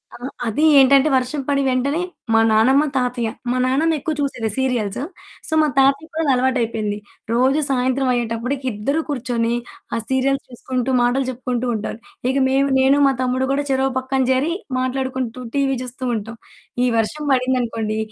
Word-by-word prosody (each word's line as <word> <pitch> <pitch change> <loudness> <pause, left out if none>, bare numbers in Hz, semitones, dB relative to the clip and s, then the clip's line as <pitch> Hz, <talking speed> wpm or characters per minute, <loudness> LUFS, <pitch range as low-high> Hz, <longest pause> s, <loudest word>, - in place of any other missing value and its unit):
ఆహ్, 250 +3 -6 0.2
అది 295 +9 +1
ఏంటంటే 275 +2 +5
వర్షం 260 +3 0
పడిన 280 -1 +1
వెంటనే 280 +6 0 0.3
మా 225 - +5
నానమ్మ, 260 +7 +4
తాతయ్య, 245 -2 -1 0.2
మా 255 - 0
నాన్నమ్మ 305 +6 +2
ఎక్కువ 310 +2 -2
చూసేది 245 -6 -1
సీరియల్స్. 245 -6 -1 0.5
సో 315 - -4
మా 305 - +3
తాతయ్యకి 275 +4 +3
కూడా 320 - -1
అది 275 - +3
అలవాటు 255 0 +1
అయిపోయింది. 215 -2 -2 0.4
రోజు 260 +5 +3
సాయంత్రం 260 0 +1
అయ్యేటప్పటికి 240 +3 -2
ఇద్దరు 275 +10 -1
కూర్చొని 235 -3 -1 0.4
ఆ - - 0
సీరియల్స్ 270 +1 +1
చూసుకుంటూ 255 +1 -3
మాటలు 250 +2 +1
చెప్పుకుంటూ 250 0 -3
ఉంటారు. 215 +1 -4 0.3
ఇక 270 - 0
మేము, 275 +1 +2
నేను 270 +2 +4
మా - - +4
తమ్ముడు 255 +1 0
కూడా 285 +1 0
చెరో 265 0 +2
పక్కన 260 +1 -1
చేరి 275 +6 +1 0.3
మాట్లాడుకుంటూ 255 -1 -2
టీవీ 270 -1 +1
చూస్తూ 255 +1 -6
ఉంటాం. 225 +2 -6 0.5
ఈ - - +3
వర్షం 295 +8 -1
పడింది 255 0 +2
అనుకోండి. 220 -2 -3
260 Hz, 160 wpm, -20 LUFS, 240-275 Hz, 0.5 s, ఏంటంటే